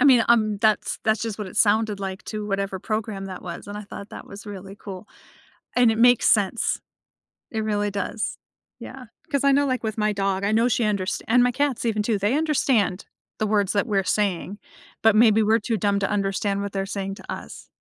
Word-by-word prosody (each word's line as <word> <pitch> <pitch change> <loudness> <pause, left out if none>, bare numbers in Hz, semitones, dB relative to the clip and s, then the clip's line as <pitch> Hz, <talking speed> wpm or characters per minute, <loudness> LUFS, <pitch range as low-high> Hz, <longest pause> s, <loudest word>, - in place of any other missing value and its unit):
I - - +4
mean, 250 -5 +6
um, 215 -3 +3
that's 215 0 +1
that's 220 0 +2
just 225 -3 -3
what 210 - -4
it - - -10
sounded 215 -1 +2
like 190 0 -5
to 210 -1 -5
whatever 195 -1 -2
program 215 -1 -3
that 185 -1 -8
was, 170 -2 -7
and 205 +1 -7
I - - -6
thought 200 0 -9
that - - -9
was 205 +1 -11
really 195 -1 -8
cool, 195 -1 -9 0.7
and 245 -2 +5
it 220 - -2
makes 245 +1 +5
sense. 210 +1 +2 0.7
It 220 - -2
really 205 -1 0
does, 200 +2 -3 0.4
yeah, 260 -1 -9 0.3
'cause 280 -1 +1
I 280 - +5
know, 285 +1 +3
like, 255 -2 -1
my 210 -1 +1
dog, 195 -1 -1
I 200 - +1
know 230 +3 +3
she 240 0 +1
underst 205 -3 -1
and 245 +2 +5
my 245 - +3
cats 270 -2 -1
even, 215 -2 +1
too, 215 -1 +1
they 205 +7 +1
understand 260 - +1 0.3
the 215 - +1
words 205 -2 +1
that 205 - +1
we're 195 -2 +1
saying, 195 0 -1 0.5
but 220 -1 +5
maybe 220 -1 +5
we're 220 +2 +3
too 225 +1 -1
dumb 200 +1 +1
to 200 - -1
understand 200 0 -1
what 200 0 -4
they're 195 -1 -1
saying 195 -1 -4
to - - -10
us. - - -8
210 Hz, 215 wpm, -24 LUFS, 200-225 Hz, 0.7 s, mean